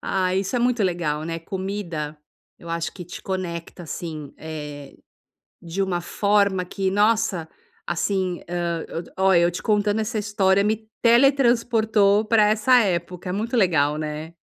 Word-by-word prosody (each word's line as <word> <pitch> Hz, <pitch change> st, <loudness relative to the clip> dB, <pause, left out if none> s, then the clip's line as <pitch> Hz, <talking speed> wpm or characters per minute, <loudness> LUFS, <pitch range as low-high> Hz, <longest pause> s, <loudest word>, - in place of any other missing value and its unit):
Ah, 185 Hz, -1 st, 0 dB
isso 195 Hz, +6 st, -1 dB
é -, -, +2 dB
muito 245 Hz, -2 st, +1 dB
legal, 170 Hz, -5 st, -1 dB
né. 165 Hz, 0 st, -3 dB
Comida, 175 Hz, -4 st, -4 dB, 0.4 s
eu 170 Hz, -, -12 dB
acho 165 Hz, 0 st, -2 dB
que 180 Hz, -, -9 dB
te 175 Hz, -, -9 dB
conecta, 175 Hz, -2 st, -5 dB
assim, 155 Hz, -3 st, -6 dB
eh, 150 Hz, -3 st, -8 dB, 0.7 s
de 170 Hz, +3 st, -3 dB
uma 180 Hz, -2 st, -1 dB
forma 200 Hz, -1 st, +1 dB
que 190 Hz, +1 st, -2 dB
nossa, 205 Hz, -4 st, +2 dB, 0.4 s
assim 180 Hz, +1 st, -1 dB
hã, 170 Hz, -1 st, -2 dB, 0.3 s
ó, 190 Hz, 0 st, +4 dB
eu 170 Hz, 0 st, +5 dB
te 175 Hz, -, -6 dB
contando 210 Hz, 0 st, +1 dB
essa 220 Hz, +1 st, -3 dB
história 200 Hz, -2 st, +2 dB
me 215 Hz, +1 st, -1 dB
teletransportou 230 Hz, -5 st, +4 dB
para 215 Hz, -1 st, +4 dB
essa 230 Hz, +4 st, +4 dB
época. 180 Hz, -3 st, -2 dB
É -, -, -1 dB
muito 220 Hz, +5 st, -2 dB
legal, 150 Hz, -7 st, +3 dB
né. 155 Hz, +1 st, -5 dB
190 Hz, 150 wpm, -23 LUFS, 170-210 Hz, 0.7 s, eu